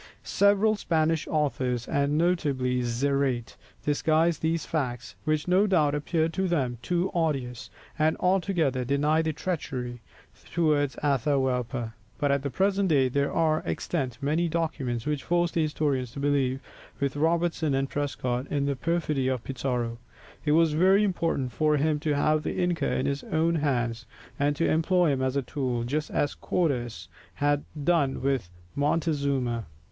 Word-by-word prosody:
Several 205 +2 +3
Spanish 160 -5 0
authors, 130 -5 -1
and 140 +1 +1
notably 140 -7 +1
Zarate, 125 0 0 0.3
disguise 160 +2 +2
these 160 0 0
facts, 125 -6 -3
which 155 0 0
no 190 +4 +4
doubt 155 -7 +3
appeared 160 +2 0
to 190 +1 0
them 130 -9 -1
too 180 +5 0
odious, 135 -8 -2 0.3
and 155 +1 +2
altogether 175 -8 +1
deny 145 +5 +2
the 160 0 0
treachery 130 -8 -4 0.5
towards 150 -6 +2
Atahualpa. 130 -4 0 0.2
But 145 -2 +1
at 140 -1 +1
the 140 - -2
present 195 +4 +1
day 135 -4 +3
there 140 +2 0
are 155 -1 +2
extant 130 -8 -2
many 160 +4 +1
documents 150 -8 -2
which 150 -2 -1
force 175 0 +1
the 165 - 0
historian 150 -4 0
to 120 +4 -9
believe, 135 -2 +1 0.4
with 140 -1 -1
Robertson 165 -1 +1
and 135 0 0
Prescott, 135 -3 -2
in 140 -1 -1
the 140 0 0
perfidy 150 -2 0
of 130 -3 -1
Pizarro. 120 -3 -2 0.4
It 150 - +2
was 165 -1 +4
very 190 +6 +4
important 165 -9 0
for 150 +4 +2
him 150 +1 +1
to 150 -1 0
have 155 +2 +2
the - - -3
inca 175 -2 0
in 130 - 0
his 140 0 -1
own 165 +1 +1
hands, 120 -7 -1 0.3
and 145 +1 +2
to 165 - +1
employ 165 +1 +3
him 135 -1 -1
as 130 0 0
a 140 - +1
tool, 125 -2 -2
just 150 +6 -2
as 145 - 0
Cortès 125 -9 -1 0.3
had 145 0 +1 0.2
done 145 -5 +1
with 135 -9 0 0.3
Montezuma. 140 - 0
145 Hz, 155 wpm, -27 LUFS, 130-165 Hz, 0.5 s, no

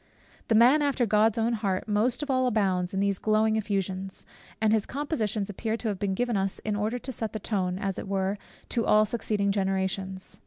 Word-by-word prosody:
The 225 - +3
man 250 +7 +6
after 280 -4 +1
God's 215 +1 +3
own 230 +1 +1
heart 200 -4 -1
most 225 +6 +1
of 290 - -2
all 255 -1 +2
abounds 190 -6 +1
in 195 - -1
these 200 -1 0
glowing 215 0 +2
effusions; 195 -3 -2 0.3
and 220 0 +3
his 220 -2 +1
compositions 230 - -2
appear 220 +2 -3
to 230 - -3
have 200 -3 -3
been 195 -2 -1
given 245 +1 0
us 195 -1 0
in 210 -1 0
order 215 +4 -1
to 260 +2 -6
set 220 -3 -4
the 220 - -3
tone, 185 -3 -1
as 195 0 -3
it - - -7
were, 195 +1 -1 0.3
to 235 - 0
all 215 -1 +4
succeeding 210 -2 -1
generations. 190 -1 -2
210 Hz, 205 wpm, -27 LUFS, 195-225 Hz, 0.3 s, man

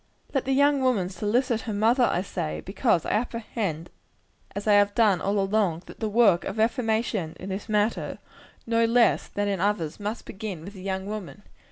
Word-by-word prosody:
Let 270 - 0
the 270 - +1
young 285 0 +4
woman 230 -9 +1
solicit 220 +5 0
her - - -1
mother, 230 +5 +3
I 180 - 0
say; 75 - -4
because 195 - +1
I - - -2
apprehend, 215 -7 -2 0.6
as 200 - -4
I 210 - +4
have 205 0 +4
done 210 -6 +3
all 200 +1 0
along, 195 -4 +1
that - - -13
the 220 - -1
work 210 -5 +4
of 195 - -5
reformation 220 - 0
in 190 - -7
this 195 +4 -5
matter, 210 +1 0 0.5
no 230 0 +2
less 235 +1 +3
than 205 0 -2
in 200 -2 -1
others, 185 -5 -1
must 210 +3 -4
begin 190 -5 -6
with 200 - -9
the 190 - -11
young 190 0 -3
woman. 205 0 -7
210 Hz, 190 wpm, -26 LUFS, 190-230 Hz, 0.6 s, young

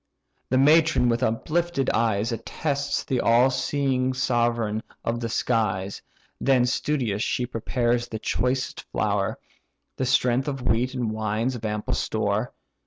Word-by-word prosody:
The 130 - +2
matron 155 -1 +5
with 115 +1 +1
uplifted 140 +5 0
eyes 110 0 +1
Attests 140 +5 -2
the 130 -2 -1
all 120 +3 +4
seeing 130 -2 0
sovereign 120 -4 0 0.2
of 115 +1 -1
the 115 -1 -3
skies. 100 -5 -1 0.4
Then 130 -2 +3
studious 125 -5 -1
she 125 - 0
prepares 120 0 -1
the 110 - -5
choicest 125 +4 -1
flour, - - 0 0.6
The 130 - -1
strength 130 +1 +2
of 135 -3 -3
wheat 125 +3 +1
and 120 -4 -1
wines 110 +3 -1
an 115 -3 -4
ample 105 0 -2
store. - - -1
120 Hz, 135 wpm, -25 LUFS, 115-130 Hz, 0.6 s, matron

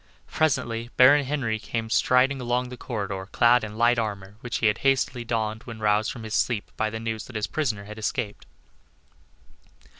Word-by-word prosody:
Presently 120 -6 0
Baron 140 +3 +7
Henry 130 -6 -1
came 110 +1 -4
striding 130 +3 +3
along 125 +1 -1
the 125 - -7
corridor 100 -6 -4
clad 120 0 +4
in 110 0 -6
light 120 +1 +4
armor, 100 -3 -4
which 120 -1 -3
he - - -1
had 105 -1 +3
hastily 135 -2 +1
donned 110 -1 -2
when 115 -2 -8
roused 105 0 +1
from 115 - -8
his 110 -1 -6
sleep 115 -5 0
by 110 - 0
the 110 +1 -5
news 110 -1 -4
that 130 - -12
his 105 -1 0
prisoner 115 -11 -2
had 105 +2 -9
escaped. 110 -1 -3
115 Hz, 180 wpm, -25 LUFS, 110-125 Hz, -, Baron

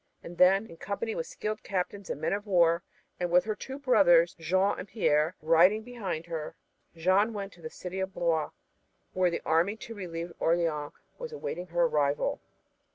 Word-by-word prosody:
And 170 0 -10
then, 195 +3 +5
in 165 -6 -13
company 210 +5 -3
with 165 - -4
skilled 215 0 -4
captains 195 +1 -3
and - - -3
men 155 - 0
of 205 +1 -3
war, 170 -3 +4 0.4
and 175 -1 -1
with 180 +1 +5
her 215 - -1
two 265 +5 -7
brothers, 190 -10 +4
Jean 185 +5 +1
and 185 - -6
Pierre, 160 -6 +1
riding 175 +7 +5
behind 205 -9 -5
her, 165 -3 -5 0.4
Jeanne 190 +7 +2
went 200 -2 -5
to 175 - -18
the 155 - -6
city 185 +3 -6
of 190 0 -2
Blois, 165 -4 0 0.6
where 185 -1 +3
the 170 - -4
army 170 +6 +2
to 230 - -8
relieve 170 -4 -6
Orleans 165 -3 0 0.3
was - - -6
awaiting 180 - -5
her 175 0 +1
arrival. 150 -3 +1
180 Hz, 180 wpm, -29 LUFS, 165-200 Hz, 0.6 s, then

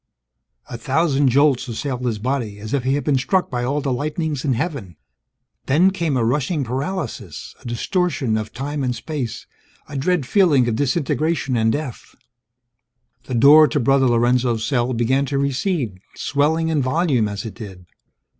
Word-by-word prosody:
_ - - -6
A 115 - -5
thousand 145 -1 +1
jolts 135 -1 +3
assailed 125 +2 -4
his 120 -3 -1
body, 120 -2 -3
as 105 +3 -7
if 140 -3 0
he 135 +2 +1
had 145 - -2
been 140 -3 +1
struck 180 +8 0
by 120 -1 -2
all 140 +4 -1
the 135 -2 -1
lightnings 150 +1 -2
in 140 -4 +1
heaven. 125 - -4 0.7
Then, 170 +8 +4
came 170 -7 -1
a 115 - +1
rushing 145 +5 0
paralysis, 130 - -5
a - - -10
distortion 135 - -1
of 110 0 -3
time 140 +3 -4
and 125 -1 -1
space, 125 -6 -5 0.4
a 145 - -9
dread 150 +2 0
feeling 150 - +3
of 115 - 0
disintegration 145 +1 0
and 110 -1 +2
death... 145 -2 -5 1.1
The 130 - -4
door 150 +6 +7
to 150 - -1
Brother 135 +1 +3
Lorenzo's 120 -1 +2
cell 125 -3 0
began 130 +4 +1
to 140 - -1
recede, 140 - -1 0.2
swelling 160 +3 0
in 155 -3 +1
volume 130 -4 +1
as 100 +3 -5
it 110 - -6
did. 95 -6 -10
135 Hz, 170 wpm, -21 LUFS, 120-150 Hz, 1.1 s, door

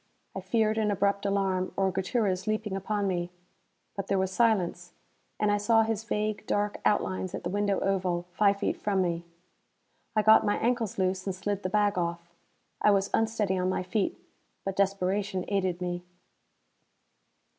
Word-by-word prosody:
I 190 - -3
feared 220 +3 +1
an 215 -1 +1
abrupt 200 0 +1
alarm, 190 -2 0
or 190 -1 +2
Gutierrez 190 0 -1
leaping 215 -2 -1
upon 200 +1 -1
me. 175 -2 -1 0.7
But 195 -1 -4
there 195 - +1
was 190 0 0
silence, 185 -5 +1 0.5
and 210 -1 +2
I 205 - +3
saw 225 +2 +4
his 220 -1 -2
vague 215 -2 -2
dark 205 0 0
outlines 185 -3 0
at - - -6
the 175 - -3
window 205 -1 +1
oval, 180 -3 0
five 200 +2 +3
feet 200 - -1
from 195 -2 +1
me. 170 -1 -2 0.9
I 215 - +3
got 220 +1 +7
my 205 - +1
ankles 235 -3 0
loose 185 0 0
and 190 - -1
slid 200 +1 -2
the 185 - -2
bag 205 -1 +2
off. 170 0 -3 0.5
I - - +5
was 200 -1 +2
unsteady 220 -4 +1
on 180 0 +1
my 185 - -1
feet, 195 +2 -1 0.5
but 195 -1 -2
desperation 195 0 0
aided 190 -3 0
me. 175 0 -3
195 Hz, 165 wpm, -28 LUFS, 185-210 Hz, 0.9 s, got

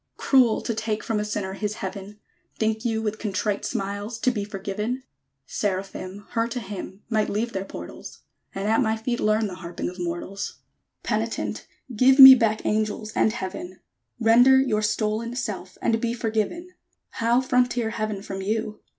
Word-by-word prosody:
Cruel 255 -5 +4
to 230 - -2
take 220 -1 -2
from 225 -2 -1
a - - 0
Sinner 205 -2 -3
his 210 +1 -3
Heaven! 195 +1 -7 0.4
Think 220 0 0
you 225 -2 -1
with 215 0 -2
contrite 205 0 -1
smiles 205 +3 -3
To 255 - +3
be 210 -4 -3
forgiven? 210 +5 -4 0.4
Seraphim, 195 +2 -4
Her 230 0 +1
to 240 +1 -4
hymn, 200 -2 -8
Might 220 -2 +1
leave 225 +3 -2
their 190 0 -3
portals; - - -9 0.3
And 195 +1 -2
at 225 +4 +3
my 220 -2 +1
feet 240 +2 -2
learn 215 +1 +2
The 185 -3 -5
harping 175 -1 -5
of 180 - -13
mortals! 175 +3 -4 0.5
Penitent! - - -2 0.3
give 260 +4 +5
me 265 -1 +13
back 225 -4 +1
Angels, 215 0 -1
and 220 - +3
Heaven; 185 -3 -6 0.4
Render 245 +3 +6
your 235 -6 +1
stolen 215 +2 -1
self, 205 -6 -5
And 225 0 +1
be 235 0 -1
forgiven! 225 - -2 0.4
How 235 +2 +2
frontier 245 -3 +1
Heaven 215 -3 -3
from 195 -1 -5
you? 215 +2 -2
215 Hz, 165 wpm, -25 LUFS, 200-230 Hz, 0.5 s, me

